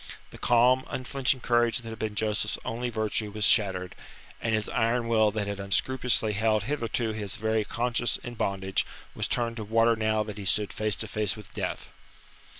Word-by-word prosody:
The - - -12
calm, 125 +2 +4
unflinching 130 0 0
courage 120 -1 +2
that 115 -2 -7
had 110 -1 -8
been 110 -1 -3
Joseph's 105 -1 0
only 120 +2 -2
virtue 110 -1 -1
was 105 0 -1
shattered, 95 -4 +3 0.5
and 115 -1 +1
his 105 -1 -1
iron 115 +1 +1
will 110 -2 +4
that 105 0 -2
had 100 0 -4
unscrupulously 115 +3 +1
held 110 0 +2
hitherto 120 -2 -1
his 105 -2 -3
very 110 0 0
conscience 120 +2 -1
in 120 - -6
bondage 95 -3 -1 0.3
was - - -1
turned 115 -1 -1
to 110 - -4
water 115 +2 +3
now 110 -1 +1
that 105 -1 -7
he 100 - -6
stood 105 +2 +1
face 110 -1 0
to 110 - -4
face 105 0 -1
with 105 - -12
death. - - -4
110 Hz, 185 wpm, -28 LUFS, 105-120 Hz, 0.5 s, calm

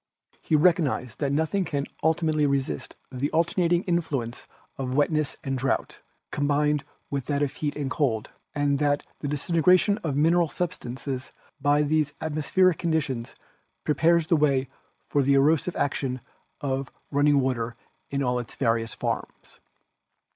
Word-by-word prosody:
He 155 - +1
recognised 150 - +2
that 140 -2 0
nothing 160 +7 +1
can 145 -5 -2 0.2
ulti 160 +2 +2
mately 155 -3 +2
resist 135 - -2 0.2
the 135 +2 -1
alternating 170 +1 +2
influence 150 -9 -2 0.3
of 130 -1 -3
wetness 150 0 +1
and 135 -1 -1
drought, 135 +1 -1 0.3
combined 145 0 +1 0.3
with 140 -3 -2
that 145 +1 0
of 140 - -1
heat 150 -2 -3
and 140 -2 -3
cold, 120 -8 0 0.2
and 145 -1 +1
that 145 -1 +1
the 145 - -4
disintegration 175 +7 +3
of 155 -9 -2
mineral 165 +3 +3
substances 130 -5 -4 0.3
by 145 +1 +3
these 150 -1 +1
atmospheric 160 +3 +2
conditions 145 -8 -1 0.5
prepares 165 +2 +3
the 170 +1 +3
way 135 -4 +2 0.4
for 145 - +2
the 140 +1 +3
erosive 155 +5 +3
action 135 -2 -1 0.4
of 135 -1 -2 0.2
run 145 0 +2
ning 145 -1 +5
water 120 -3 -1 0.3
in 140 0 -1
all 125 -1 +1
its 120 - -7
various 115 -3 0
forms. - - -5
145 Hz, 145 wpm, -26 LUFS, 135-160 Hz, 0.5 s, ning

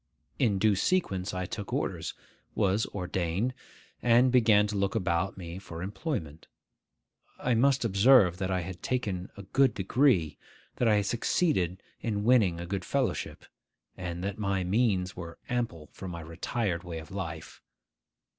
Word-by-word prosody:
In 110 -6 +3
due 105 +1 +3
sequence 95 - 0
I 95 0 -3
took 100 +2 -6
orders, - - -2 0.4
was 100 +3 +2
ordained, 95 +4 -2 0.5
and 120 +2 +5
began 110 -4 +5
to 105 0 -3
look 100 +1 0
about 95 -2 0
me 85 0 -7
for 85 -3 -8
employment. 95 - -4 0.9
I 125 - 0
must 130 +2 +3
observe 100 -3 +5
that 95 0 -2
I 95 -1 0
had 85 0 -7
taken 100 -8 -2
a 100 - -8
good 130 +7 +2
degree, 95 - +2 0.4
that 125 - +2
I 110 - +5
had 105 -1 +1
succeeded 100 - 0 0.2
in 105 -3 -1
winning 105 -8 +4
a 85 - -5
good 95 +1 -3
fellowship, - - -2 0.5
and 90 -1 -5
that 100 +2 -3
my 100 -2 0
means 95 -2 +1
were 85 -1 -8
ample 115 - -3
for 95 - -8
my 85 -2 -6
retired 85 +3 -2
way 85 -3 -6
of 80 +3 -9
life. 85 -5 -6
95 Hz, 155 wpm, -29 LUFS, 90-115 Hz, 0.9 s, and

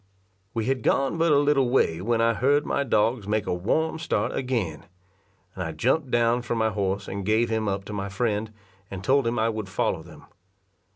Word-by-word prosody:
We 115 -1 -1
had 130 0 0
gone 135 +8 +1
but 165 -1 +3
a 145 - +5
little 140 -3 +3
way 85 -10 +2
when 115 +3 +1
I 115 0 +3
heard 145 +6 +2
my 140 - 0
dogs 110 -3 +1
make 105 0 0
a - - -1
warm 160 - 0
start 170 - -1
again; 105 - -2 0.7
and 90 - -4
I 80 -2 -4
jumped 130 - +1
down 120 0 +2
from 120 -1 -3
my 110 0 +1
horse 100 0 -2
and 100 0 -4
gave 110 +3 +1
him 110 -1 0
up 100 0 -2
to 105 - -7
my 100 -1 -3
friend, 105 +1 -1 0.4
and 95 -1 -7
told 135 +2 +3
him 120 +1 -1
I 110 +1 +2
would 110 -3 -4
follow - - -1
them. - - -14
115 Hz, 210 wpm, -25 LUFS, 100-130 Hz, 0.7 s, a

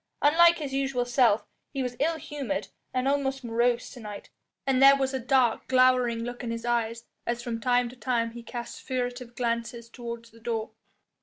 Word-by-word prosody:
Unlike 340 +3 +6
his 285 -4 -5
usual 270 -2 0
self 245 -3 +3 0.2
he 275 -2 -3
was 250 -1 -3
ill 320 +3 +1
humoured 245 -10 -4 0.2
and 255 +1 0
almost 270 -1 0
morose 235 +1 +1
to 250 - -10
night, 210 -3 -8 0.3
and 265 -1 +2
there 275 +1 +9
was 270 0 0
a 265 - -1
dark, 250 -2 +2
glowering 255 -2 +4
look 245 +1 -6
in 240 - -3
his 230 0 -4
eyes 230 -1 -1 0.2
as 235 0 -1
from 230 -2 -4
time 245 0 +3
to 250 - -12
time 240 -2 0
he 235 +1 -9
cast 235 +1 -7
furtive 245 -2 -3
glances 235 0 -2
towards 235 -1 -7
the 230 - -17
door. 225 -1 -3
245 Hz, 185 wpm, -27 LUFS, 235-265 Hz, 0.3 s, there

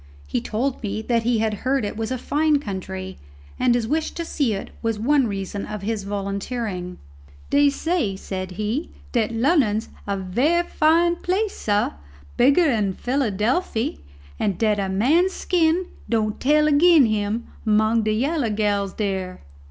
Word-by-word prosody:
He 70 +12 -2
told 250 +5 -2
me 215 0 -3
that 235 0 +1
he 235 0 +1
had 220 0 0
heard 260 -2 +1
it 205 - -4
was 225 0 -3
a 255 - -2
fine 300 +4 +2
country, 190 -5 -6 0.4
and 245 -1 +3
his 235 -2 0
wish 315 +4 0
to 335 - -4
see 270 -10 0
it 195 - -7
was 225 -2 -1
one 265 +3 +2
reason 195 0 -4
of 210 -2 -6
his 210 -1 -2
volunteering. 200 -1 -4 0.5
"Dey 285 0 +5
say," 280 - -1
said 185 -1 -5
he, 215 - -2 0.2
"dat 230 -3 +1
Lunnon's 230 -3 +2 0.2
a 200 0 -1
very 250 - +1
fine 340 +2 +3
place, 390 +5 -1
sah, 205 0 0 0.4
bigger 280 +7 +5
dan 215 -9 +1
Philadelphy, 235 - -1 0.4
and 195 -4 0
dat 210 -1 +1
a 195 -1 -1
man's 300 - +3
skin 345 0 +1 0.2
don' 215 -2 +1
tell 300 +3 +3
agin 305 0 +6
him 215 +1 -1 0.2
among 220 +1 +3
de 215 0 0
yaller 270 +2 0
gals 205 -2 0
dere." 190 -3 -3
225 Hz, 160 wpm, -23 LUFS, 205-285 Hz, 0.5 s, agin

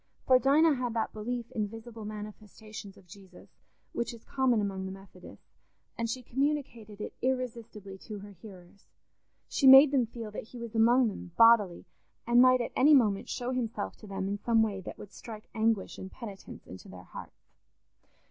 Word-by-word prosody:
For 255 -1 +5
Dinah 300 +4 +4
had 245 -2 -3
that 225 - -2
belief 235 +2 -5
in 215 -2 -2
visible 225 0 -10
manifestations 210 -1 -9
of 195 - -18
Jesus, 185 0 -16 0.4
which 235 0 -3
is 225 - -17
common 260 -4 +1
among 195 -2 -3
the - - -6
Methodists, 195 0 -14 0.5
and 230 0 -3
she 255 +2 -4
communicated 245 -6 -3
it - - -6
irresistibly 230 -6 -4
to 215 - -6
her 205 +1 -11
hearers: 190 -1 -15 0.6
she 275 - +2
made 270 +2 +10
them 255 -5 +2
feel 225 -2 -8
that 210 - -7
he 250 - -12
was 235 -1 -7
among 235 +2 +4
them 185 -4 -7
bodily, 230 -6 +5 0.4
and 240 +1 +5
might 255 0 +5
at - - -4
any 295 +3 +6
moment 210 -7 +2
show 245 +1 -3
himself 230 -5 -3
to 215 - -13
them 195 -1 -4
in 200 +1 -3
some 225 +1 +3
way 200 -3 -3
that 185 - -9
would 205 - -11
strike 215 -2 -10
anguish 220 -2 0
and 190 - -8
penitence 205 -5 -10
into 95 - -12
their 90 -1 -11
hearts. - - -13
225 Hz, 180 wpm, -29 LUFS, 200-245 Hz, 0.6 s, made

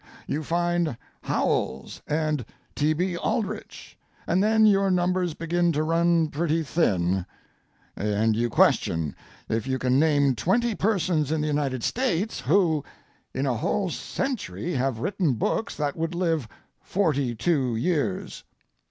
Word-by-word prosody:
You 150 - -2
find 170 -3 0 0.2
Howells 65 +1 -1
and 155 -3 0 0.3
T. 150 +2 +1
B. 180 +3 -1
Aldrich, 215 +3 -4 0.3
and 175 +3 +2
then 220 +1 +4
your 195 -2 +4
numbers 180 -2 +1
begin 170 +1 +1
to 150 +1 0
run 165 0 +2
pretty 160 +1 0
thin, 95 - +1 0.7
and 105 +2 +1
you 120 +2 0
question 80 -8 +2 0.3
if 115 +3 -2
you 130 0 0
can 130 +1 +2
name 145 -3 +3
twenty 225 - +1
persons 180 -8 0
in 160 - +1
the 150 - 0
United 140 -5 -1
States 225 -5 0
who—in 155 -4 -1
a 125 -4 0
whole 190 - -1
century 245 - -3
have 130 -3 0
written 175 - 0
books 220 - -1
that 145 -2 -2
would 165 +1 -3
live 165 -8 0 0.3
forty 145 -10 0
two 130 -2 +1
years. 140 - -1
160 Hz, 135 wpm, -25 LUFS, 130-180 Hz, 0.7 s, then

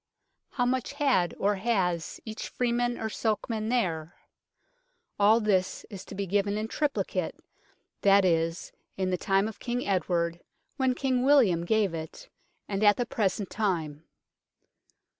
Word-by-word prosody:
How 245 - +1
much 255 +2 -1
had 270 -12 +1
or 205 0 +1
has 185 -6 -1
each 220 -1 -6
freeman 240 0 0
or 220 - -3
sokeman 220 0 -2
there? 175 -9 -1 1.0
All 210 +3 +6
this 195 -4 0
is 195 -3 -7
to - - -9
be 200 0 -2
given 200 +2 0
in 215 +1 -2
triplicate; 290 +4 -1 0.7
that 200 -1 +5
is, 165 -1 0 0.3
in 190 -1 0
the - - +2
time 195 +3 +1
of 220 - -8
King 245 0 -2
Edward, 175 -3 0 0.4
when 260 -2 +1
King 260 -2 0
William 230 -12 +4
gave 210 -2 +2
it, 160 -1 -7 0.4
and 200 +1 -2
at 205 -1 +6
the 245 - 0
present 205 -4 -1
time. 165 -8 -2
205 Hz, 140 wpm, -28 LUFS, 180-235 Hz, 1.0 s, All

